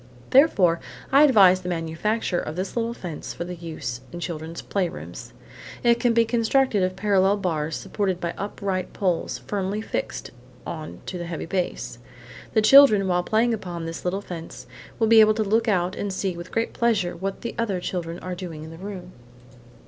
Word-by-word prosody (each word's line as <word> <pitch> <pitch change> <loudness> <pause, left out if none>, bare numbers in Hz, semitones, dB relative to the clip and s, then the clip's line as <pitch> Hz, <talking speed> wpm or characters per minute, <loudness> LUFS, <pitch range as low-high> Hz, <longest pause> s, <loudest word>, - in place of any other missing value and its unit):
Therefore, 200 - +5 0.3
I 275 +2 +7
advise 195 -9 +6
the 180 - -5
manufacture 175 +4 -1
of 155 - -5
this 185 +2 -4
little 235 0 -1
fence 170 -8 -7
for - - -4
use 160 -8 -6
in 175 - -7
children's 165 -1 -5
playrooms. 185 -4 -4 0.5
It 235 -1 +4
can 240 - +3
be 230 0 +5
constructed 230 -1 +2
of 185 0 0
parallel 195 0 +3
bars 160 -5 -2
supported 190 -4 -2
by 170 -1 -3
upright 195 -2 -3
poles 180 -4 -1
firmly 200 0 -2
fixed 220 - -4 0.3
on 155 -2 -7
to 180 - -5
the 175 - -5
heavy 165 -2 -4
base. 175 -8 -3 0.5
The 220 - +3
children, 215 -5 +7
while 180 -1 +2
playing 225 +5 +2
upon 175 -6 -5
this 165 0 -6
little 185 +3 -1
fence, 170 -4 -8 0.3
will 225 - +2
be 225 0 +7
able 215 0 +6
to 220 - +1
look 225 +3 +1
out 185 -3 +1
and 200 - -3
see 190 -1 -2
with 170 0 -9
great 225 0 -1
pleasure 210 -7 +1
what 195 +3 -4
the 235 - -4
other 205 -6 0
children 170 -2 -4
are 185 - -4
doing 175 -4 -7
in 160 - -9
the 165 - -10
room. 185 -2 -7
185 Hz, 180 wpm, -24 LUFS, 175-215 Hz, 0.5 s, I